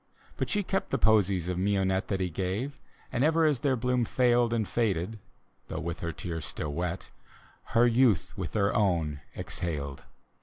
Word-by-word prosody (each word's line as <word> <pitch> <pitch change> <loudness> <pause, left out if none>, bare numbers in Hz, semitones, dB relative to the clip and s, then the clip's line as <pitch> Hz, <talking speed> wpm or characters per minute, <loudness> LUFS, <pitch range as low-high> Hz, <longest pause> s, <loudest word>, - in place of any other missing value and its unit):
But - - -2
she 205 -1 +1
kept 195 +1 -1
the 135 - +1
posies 100 -6 +3
of 90 -1 -1
mignonette 95 0 +1
That 95 -2 -1
he 90 -2 -1
gave; 100 - -2 0.4
and 120 - +1
ever 160 +1 +4
as 150 -5 +2
their 135 0 +2
bloom 125 0 +1
failed 120 0 +3
And 110 -3 0
faded 105 -2 -1 0.5
(though - - -4
with 85 0 -4
her 85 - -3
tears 80 +1 -5
still 75 -1 -4
wet) 90 +3 -3 0.7
Her 120 - +7
youth 120 -6 +3
with - - -4
their 100 -1 +1
own 85 -8 +1 0.2
exhaled. 70 -5 -4
100 Hz, 175 wpm, -29 LUFS, 85-120 Hz, 0.7 s, Her